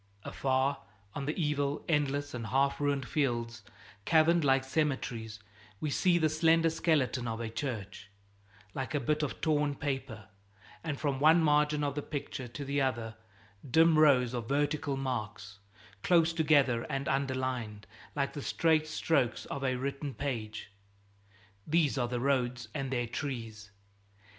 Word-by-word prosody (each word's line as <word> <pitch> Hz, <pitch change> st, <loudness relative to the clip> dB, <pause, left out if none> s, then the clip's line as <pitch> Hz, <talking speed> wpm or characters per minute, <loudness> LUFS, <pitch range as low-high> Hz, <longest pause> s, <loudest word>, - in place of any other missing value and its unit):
Afar, 135 Hz, +1 st, 0 dB, 0.3 s
on 140 Hz, -, -4 dB
the 150 Hz, -, -2 dB
evil, 145 Hz, -2 st, -1 dB
endless, 145 Hz, -2 st, 0 dB
and 115 Hz, -3 st, -5 dB
half 140 Hz, +4 st, +1 dB
ruined 140 Hz, -3 st, 0 dB
fields, 120 Hz, -5 st, -1 dB, 0.4 s
caverned 160 Hz, +4 st, +4 dB
like 135 Hz, -1 st, +3 dB
cemeteries, 130 Hz, -6 st, -2 dB, 0.4 s
we 150 Hz, -, -2 dB
see 175 Hz, +4 st, +3 dB
the 160 Hz, -2 st, +3 dB
slender 160 Hz, +1 st, +3 dB
skeleton 140 Hz, -7 st, +1 dB
of 110 Hz, 0 st, -3 dB
a 115 Hz, -1 st, -3 dB
church, 110 Hz, -6 st, -5 dB, 0.6 s
like 135 Hz, +3 st, -4 dB
a -, -, +2 dB
bit 150 Hz, +1 st, 0 dB
of 150 Hz, -, -3 dB
torn 150 Hz, -2 st, +1 dB
paper; 135 Hz, -6 st, -4 dB, 0.6 s
and 150 Hz, -4 st, -3 dB
from 140 Hz, -3 st, -1 dB
one 160 Hz, +3 st, +5 dB
margin 150 Hz, 0 st, +3 dB
of 140 Hz, -1 st, -1 dB
the 145 Hz, -, -3 dB
picture 140 Hz, -3 st, -5 dB
to 140 Hz, +4 st, -7 dB
the 140 Hz, +1 st, 0 dB
other, 120 Hz, -4 st, -1 dB, 0.6 s
dim 160 Hz, +3 st, +5 dB
rows 130 Hz, -5 st, +5 dB
of 120 Hz, -2 st, -4 dB
vertical 145 Hz, 0 st, 0 dB
marks, 105 Hz, -6 st, -4 dB, 0.4 s
close 165 Hz, -, +3 dB
together 145 Hz, -7 st, +3 dB
and 140 Hz, -1 st, -2 dB
underlined, 130 Hz, -6 st, -2 dB, 0.3 s
like 140 Hz, -1 st, -1 dB
the 145 Hz, -, -5 dB
straight 155 Hz, +1 st, +2 dB
strokes 140 Hz, -6 st, 0 dB
of 140 Hz, -, -5 dB
a 130 Hz, -1 st, +1 dB
written 140 Hz, +1 st, -4 dB
page 110 Hz, -7 st, -4 dB, 1.0 s
these 155 Hz, -3 st, +2 dB
are 125 Hz, -3 st, 0 dB
the 120 Hz, 0 st, -2 dB
roads 125 Hz, -3 st, 0 dB
and 135 Hz, -3 st, -3 dB
their 120 Hz, -2 st, -1 dB
trees. 115 Hz, -4 st, -5 dB
140 Hz, 150 wpm, -31 LUFS, 125-150 Hz, 1.0 s, one